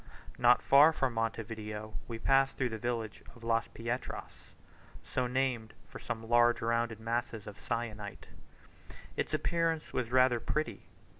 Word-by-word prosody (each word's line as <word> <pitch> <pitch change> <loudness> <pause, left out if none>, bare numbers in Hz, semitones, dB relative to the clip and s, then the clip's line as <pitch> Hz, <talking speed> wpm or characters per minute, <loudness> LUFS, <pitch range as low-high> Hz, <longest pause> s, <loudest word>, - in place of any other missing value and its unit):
Not 125 0 +5
far 145 +4 +7
from 135 -5 0
Monte 115 0 -1
Video 110 -1 -6
we 115 - -4
passed 135 +3 +3
through 125 -2 +1
the 110 -1 -5
village 115 -2 -3
of 120 - -15
Las 115 0 +1
Pietras, 120 +2 -6 0.5
so 130 -1 -1
named 125 -3 -1
from - - -10
some 115 0 -5
large 120 0 +5
rounded 115 -1 0
masses 115 -1 -2
of 105 - -9
syenite. 110 -3 -4 0.9
Its - - -1
appearance 165 -2 0
was 120 -2 -1
rather 125 -1 +5
pretty. 115 -5 -2
115 Hz, 145 wpm, -32 LUFS, 115-125 Hz, 0.9 s, far